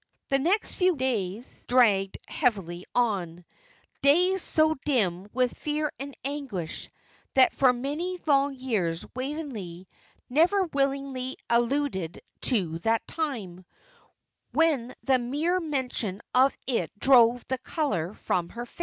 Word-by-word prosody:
The 275 - +3
next 365 +10 +1
few 365 -1 +2
days 235 -4 -3
dragged 210 -6 +3
heavily 190 - -1
on 180 -8 0 0.6
days 360 +7 +4
so 315 0 +3
dim 200 - +1
with 250 -1 0
fear 300 0 -2
and 275 0 -7
anguish 270 - -4 0.5
that 260 -1 +6
for 265 -2 +4
many 295 +9 -3
long 280 -2 +3
years 205 -11 -1
Waveney 255 - -5 0.4
never 345 +9 +3
willingly 275 -4 -2
alluded 235 - 0 0.3
to 180 -10 0
that 225 +4 +1
time, 220 - -4 0.9
when 285 -7 +2
the 265 -2 +3
mere 295 +9 0
mention 255 - -2
of 260 +2 +4
it 230 -10 -1
drove 245 0 +5
the 260 -1 -2
colour 205 - -2
from 175 -1 -1
her 240 +1 -6
face. 245 - -21
255 Hz, 120 wpm, -27 LUFS, 205-285 Hz, 0.9 s, that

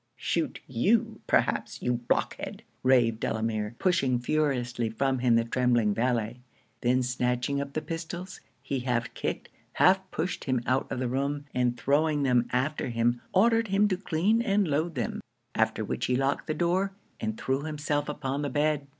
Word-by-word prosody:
_' - - -48
'Shoot - - -2
you 205 - +1
perhaps, - - +1
you 125 - 0
blockhead!' 120 0 -2 0.2
raved 120 -4 +3
Delamere, 110 -1 -2
pushing 135 -9 +2
furiously 125 -3 0
from 130 +3 0
him 120 -2 +3
the 115 - +4
trembling 120 -3 +2
valet 115 0 0 0.4
then 125 +1 +2
snatching 125 +2 0
up 140 0 -6
the 155 - -2
pistols, 170 +3 -6 0.2
he 135 - -2
half 120 -2 -1
kicked, - - -4 0.2
half 190 +1 +4
pushed 180 +2 -3
him 130 -3 0
out 130 +1 0
of - - -2
the 130 0 -1
room, 140 +3 -1
and 125 -1 +1
throwing 145 +4 +2
them 125 -3 +3
after 130 +2 0
him, 120 +1 +1
ordered 225 +3 +4
him 200 +1 +3
to 185 - +1
clean 190 +4 +1
and 205 -4 +2
load 155 +3 0
them: 120 -5 -2 0.3
after - - +1
which - - -2
he 125 - +2
locked 135 +2 0
the 155 - -1
door, 180 +4 +1 0.3
and 110 0 -3
threw 135 +1 0
himself 150 -1 -2
upon 145 -1 -2
the 145 - -1
bed. 145 0 0
135 Hz, 170 wpm, -28 LUFS, 120-155 Hz, 0.4 s, the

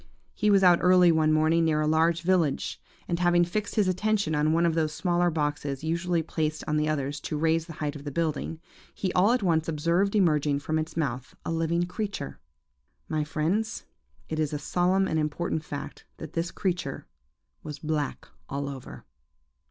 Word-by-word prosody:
He 210 - +1
was 195 -1 +5
out 175 -2 +6
early 180 -1 +6
one 155 -1 +3
morning, 155 +2 +3
near 155 -2 +2
a - - +1
large 165 +2 +2
village, 170 -6 +1 0.3
and 170 -1 -1
having 175 0 +4
fixed 205 +4 -3
his 210 -4 +3
attention 200 -2 +1
on 150 +1 +2
one 170 +1 +3
of 165 - +2
those 155 -2 0
smaller 175 0 +1
boxes 145 -3 -2
usually 170 +1 0
placed 155 -1 -2
on 150 - 0
the 150 0 +1
others 145 -1 -2
to 150 - -4
raise 160 +1 +1
the 165 - -8
height 150 -1 -3
of 145 - -8
the 145 - -4
building, 160 +1 -2 0.4
he 185 -2 -2
all 195 +5 +4
at 245 -3 +1
once 160 -3 +2
observed 170 +6 +1
emerging 150 -7 +3
from 155 +2 -1
its 155 +1 -5
mouth 130 -5 -3
a - - -2
living 165 +1 +1
creature. 195 - -5 0.7
My 155 -1 0
friends, 180 +9 -1 0.4
it 155 - -3
is 155 -1 0
a - - 0
solemn 180 +5 +1
and 160 - 0
important 155 +1 -2
fact 145 -1 -7
that 160 - -8
this 170 +1 -1
creature 180 -2 -3 0.6
was 150 -1 -7
black 150 -1 -3 0.2
all 140 +1 -3
over. 135 -2 -8
160 Hz, 185 wpm, -27 LUFS, 150-175 Hz, 0.7 s, out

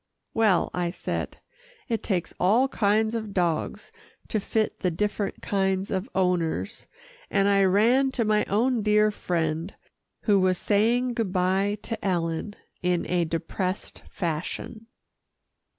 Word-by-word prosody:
"Well," 215 -5 +3
I 175 -1 -1
said, 170 - -4 0.5
"it 230 -4 -1
takes 185 -5 -2
all 220 +9 +4
kinds 220 -1 +2
of 220 -3 -4
dogs 175 - -1 0.4
to 215 - +1
fit 215 +1 -1
the 185 - +1
different 205 +3 -2
kinds 190 -1 0
of 195 +5 -2
owners," 180 +2 0 0.4
and 195 0 +2
I 200 -1 +4
ran 235 +8 +4
to 235 -4 0
my 210 0 +3
own 235 +4 +1
dear 210 0 +3
friend 165 -2 -2 0.5
who 205 -3 +3
was 185 -1 +2
saying 235 +6 +2
good 225 -5 -1
bye 190 +3 +1
to 225 -2 -5
Ellen 175 +1 -1 0.3
in 180 -1 +1
a 175 -1 +1
depressed 180 +4 -3
fashion. 180 +6 -4
200 Hz, 135 wpm, -26 LUFS, 180-215 Hz, 0.5 s, all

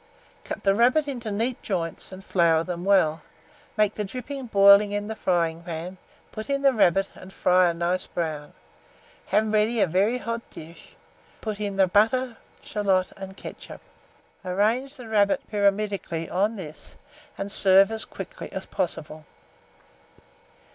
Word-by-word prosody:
Cut - - -6
the 195 - +4
rabbit 250 +8 +3
into 245 -5 -5
neat 230 +5 -2
joints, 170 -4 -3
and 190 0 -10
flour 165 -3 +3
them 175 0 -5
well; 175 -6 +3 0.6
make 210 -1 +3
the 210 - -3
dripping 255 +5 -6
boiling 200 -1 +6
in 205 +1 -3
a - - -4
fryingpan, 170 -1 -2 0.3
put 215 +2 -7
in 275 0 -1
the 275 -1 +5
rabbit, 195 -3 +2
and 185 - -13
fry 180 -1 +3
it - - +3
a - - -1
nice 175 +2 -1
brown. 155 -4 -4 0.7
Have 215 0 +1
ready 215 +2 +2
a - - +5
very 195 +8 +1
hot 230 -1 -4
dish, 165 +2 -13 0.5
put 215 -2 -5
in 205 -2 -3
the 195 -1 +4
butter, 225 +6 +2 0.3
shalot, 195 -3 0
and 195 0 -9
ketchup; - - -10 0.6
arrange 220 +9 0
the 245 -4 -10
rabbit 205 -2 +1
pyramidically 200 -5 0
on 205 +5 0
this, 155 -7 -10 0.4
and 195 +1 -4
serve 195 +1 +5
as 220 0 +3
quickly - - -8
as - - -6
possible. 155 -3 -4
200 Hz, 150 wpm, -25 LUFS, 180-220 Hz, 0.7 s, boiling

